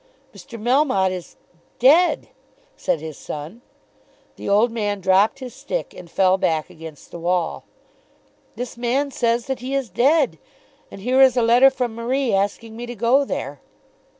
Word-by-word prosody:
"Mr. 230 - -11
Melmotte 240 -5 +2
is 180 -2 -7 0.4
dead," 315 +8 +4 0.5
said 165 - -1
his 155 -2 -8
son. 155 +10 -8 0.7
The - - -6
old 215 +4 +3
man 205 -3 -2
dropped 190 +7 +3
his 255 -3 -8
stick, - - -5
and 175 -2 -12
fell 190 +1 +2
back 160 -3 -1
against 160 -2 -12
the 170 - -8
wall. 175 -1 -1 0.9
"This 245 -1 -6
man 260 +4 -1
says 235 -2 0
that 265 -1 -3
he 260 +3 -4
is 265 -7 -2
dead, 275 - +2 0.5
and 195 - -11
here 255 +5 +2
is 260 -2 +5
a 240 - +3
letter 240 +4 +6
from 250 -3 -3
Marie 240 +1 -1
asking 205 +3 -1
me 240 +1 -7
to 240 - -7
go 240 +6 +3
there. - - -5
235 Hz, 160 wpm, -21 LUFS, 190-260 Hz, 0.9 s, letter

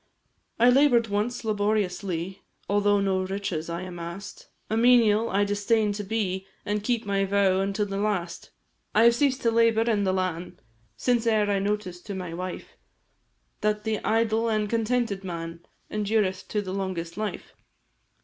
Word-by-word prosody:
I 240 +2 +6
labour'd 245 -4 +4
once 215 +4 -2
laboriously, 200 -4 -1 0.3
Although 205 0 +3
no 190 -1 +1
riches 185 -4 -3
I 170 +1 -3
amass'd; 175 +2 -8 0.2
A 220 - -1
menial 230 -2 +4
I 200 +1 +2
disdain'd 205 +1 +1
to 205 +1 -4
be, 190 -2 -2 0.2
An' 210 +1 0
keep 235 +1 -1
my 200 -1 +1
vow 195 -1 +2
unto 200 +2 0
the 195 -1 -4
last. 200 -4 -2 0.5
I 220 - +6
have 235 0 +7
ceased 265 +1 +1
to 230 - +3
labour 230 -1 +4
in 220 -3 +1
the 190 - +2
lan', 180 -1 -2 0.4
Since 240 -2 +1
e'er 215 -2 +3
I 200 - +1
noticed 195 -3 -3
to 200 - -4
my 180 -3 -5
wife, 180 +1 -6 0.8
That 210 0 0
the 220 -1 -1
idle 225 +1 +1
and 215 -1 0
contented 225 -2 0
man 170 -2 -6 0.2
Endureth 205 -3 0
to 210 -1 -1
the 185 -1 -5
longest 185 -4 -3
life. 215 0 -5
205 Hz, 160 wpm, -26 LUFS, 190-220 Hz, 0.8 s, have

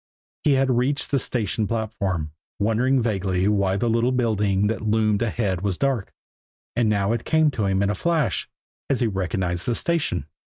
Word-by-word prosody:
He 150 - +4
had 135 0 +2
reached 130 +4 0
the 140 - +3
station 110 -3 -1
platform, 100 -7 -2 0.3
wondering 120 +5 +2
vaguely 95 -4 0
why 100 -2 +2
the 120 - 0
little 115 +2 +2
building 105 -5 +1
that 110 +1 -1
loomed 110 -1 +1
ahead 105 -5 -1
was 100 -2 -1
dark 135 -7 -1 0.6
and 115 -2 +2
now 100 -1 +1
it 115 - -2
came 160 -1 +3
to 110 -6 -1
him 95 0 +1
in 100 - +1
a - - 0
flash, 165 - 0 0.4
as 135 -2 +1
he - - +3
recognized 95 -3 -1
the 120 - +1
station. 150 - -1
110 Hz, 180 wpm, -23 LUFS, 100-125 Hz, 0.6 s, He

